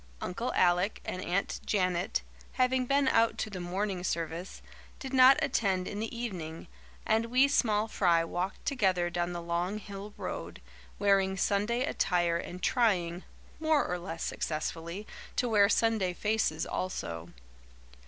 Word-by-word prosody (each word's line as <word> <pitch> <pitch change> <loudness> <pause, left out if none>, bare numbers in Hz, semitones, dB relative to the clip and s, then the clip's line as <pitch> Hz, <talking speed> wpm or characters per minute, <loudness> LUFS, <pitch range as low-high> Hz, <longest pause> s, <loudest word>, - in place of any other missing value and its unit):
Uncle 230 +7 -3
Alec 180 +3 +3
and 185 - -4
Aunt 180 +3 -1
Janet, 180 -3 0 0.3
having 255 0 +2
been 275 0 +3
out 230 -3 +3
to 215 - -3
the 190 - -5
morning 185 +1 -2
service, 170 +1 -3 0.3
did 265 -1 -7
not 260 +1 +8
attend 190 -4 +1
in 205 - -4
the 225 +2 -4
evening, 175 -9 -5 0.4
and 225 +1 +2
we 255 +4 +4
small 220 -6 +2
fry 175 -6 +3
walked 175 +3 -4
together 190 -10 +1
down 175 0 -1
the 175 - -4
long 175 +4 -1
hill 205 0 -8
road, - - -5 0.4
wearing 195 -1 +2
Sunday 210 +6 +1
attire 175 -8 +1
and 180 +1 -7
trying, 185 -8 +1 0.4
more 315 -2 +3
or 180 0 -2
less 170 -2 -5
successfully, 165 +5 -3 0.3
to 250 - +1
wear 205 -3 +5
Sunday 220 -6 +2
faces 210 -5 0
also. 85 - -4
195 Hz, 145 wpm, -30 LUFS, 175-225 Hz, 0.4 s, not